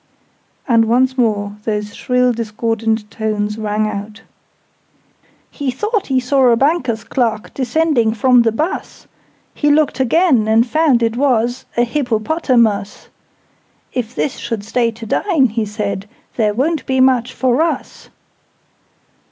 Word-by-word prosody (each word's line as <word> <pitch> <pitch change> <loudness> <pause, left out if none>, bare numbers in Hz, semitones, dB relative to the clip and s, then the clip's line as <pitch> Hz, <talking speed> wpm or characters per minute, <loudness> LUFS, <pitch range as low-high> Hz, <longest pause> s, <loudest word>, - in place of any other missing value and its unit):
And 230 -3 +4
once 255 +3 +2
more 210 -4 -1
those 210 -1 -3
shrill 250 0 +1
discordant 225 -1 -2
tones 210 -1 -2
rang 215 0 -1
out: 210 +1 -6 1.3
"He 285 -3 -3
thought 420 - -2
he 265 -2 +1
saw 260 +1 +2
a 235 - +5
Banker's 255 -4 0
Clerk 225 -5 -2
Descending 260 -4 +1
from 250 +2 +4
the 230 -1 +2
bus: 310 - -4 0.5
He 295 - 0
looked 290 -2 +2
again, 260 -3 +3
and 225 +2 +4
found 275 -3 +2
it 230 0 0
was 245 -2 +1
A 240 - +4
Hippopotamus: 235 -4 0 0.8
'If 245 -1 -4
this 280 - -2
should 230 -4 -4
stay 235 +2 0
to 225 0 -9
dine,' 275 - +1
he 220 0 -2
said, 200 -1 -4 0.3
'There 210 -3 +1
won't 305 +5 0
be 265 0 0
mutch 255 -1 +3
for 255 +2 +1
us!'" 330 0 -3
235 Hz, 135 wpm, -17 LUFS, 220-265 Hz, 1.3 s, a